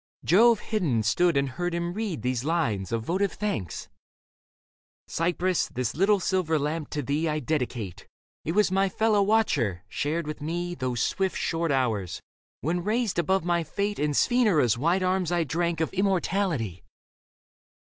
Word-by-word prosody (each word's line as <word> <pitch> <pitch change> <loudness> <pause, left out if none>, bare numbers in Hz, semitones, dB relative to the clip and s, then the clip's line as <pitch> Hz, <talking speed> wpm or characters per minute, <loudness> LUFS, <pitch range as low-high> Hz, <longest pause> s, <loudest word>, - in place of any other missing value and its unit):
Jove 225 +5 +5
hidden 155 - 0
stood 165 +9 +2
and 140 0 +2
heard 175 +6 -3
him 170 0 -2
read 200 - -3
these 125 -1 -1
lines 140 - -1
Of 115 -1 -1
votive 190 - 0
thanks 95 - -3 0.6
— - - -86
Cypris, 175 +2 0
this 125 -1 -2
little 200 +5 +3
silver 180 -4 +1
lamp 150 +2 -2
to 145 - -3
thee 150 +5 0
I 150 - 0
dedicate. 125 - -3 0.4
It 165 - -2
was 210 -1 +3
my 195 +1 +2
fellow 215 +1 +2
watcher, 145 - +1
shared 155 - -2
with 150 0 -6
me 175 +3 -3
Those 130 -6 -2
swift, 190 -1 -1
short 165 -1 -1
hours, 110 -9 0 0.4
when 170 +4 -1
raised 215 -2 0
above 190 +2 +1
my 170 -1 +1
fate 200 +6 -2
In 150 -1 0
Sphenura's 190 - +3
white 170 +9 +1
arms 185 -2 +1
I 175 -1 +2
drank 170 +2 -1
Of 160 - -1
immortality. 185 - 0
170 Hz, 155 wpm, -26 LUFS, 140-190 Hz, 0.6 s, Jove